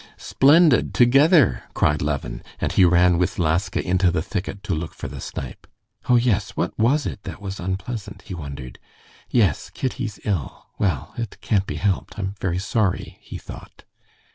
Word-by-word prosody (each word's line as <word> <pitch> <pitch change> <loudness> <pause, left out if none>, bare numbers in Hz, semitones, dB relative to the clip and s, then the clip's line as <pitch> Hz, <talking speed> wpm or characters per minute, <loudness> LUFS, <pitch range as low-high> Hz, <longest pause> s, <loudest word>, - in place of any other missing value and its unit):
"Splendid! 145 -1 +4
Together!" 135 - +5
cried 75 0 +2
Levin, 65 -5 -3 0.2
and - - -1
he 95 - +4
ran 90 0 +4
with 90 - 0
Laska 90 +4 0
into 90 0 +3
the 80 -2 0
thicket 100 +1 -5
to 95 - -2
look 80 +1 -4
for - - -6
the - - -8
snipe. - - -7 0.4
"Oh, 125 - +6
yes, 120 -3 +1
what - - -1
was 135 +6 +2
it 100 - -5
that - - -8
was 100 -1 -6
unpleasant?" 100 +2 -5
he 95 - -8
wondered. 70 -6 -8 0.5
"Yes, 100 - +2
Kitty's 125 -4 -4
ill.... 95 - -3
Well, 85 -10 -1
it 115 -3 -5
can't 100 -3 +1
be - - -4
helped; 100 0 -1
I'm 95 -1 -3
very 90 -2 0
sorry," 100 0 -1
he - - -8
thought. - - -12
95 Hz, 165 wpm, -23 LUFS, 85-115 Hz, 0.5 s, Oh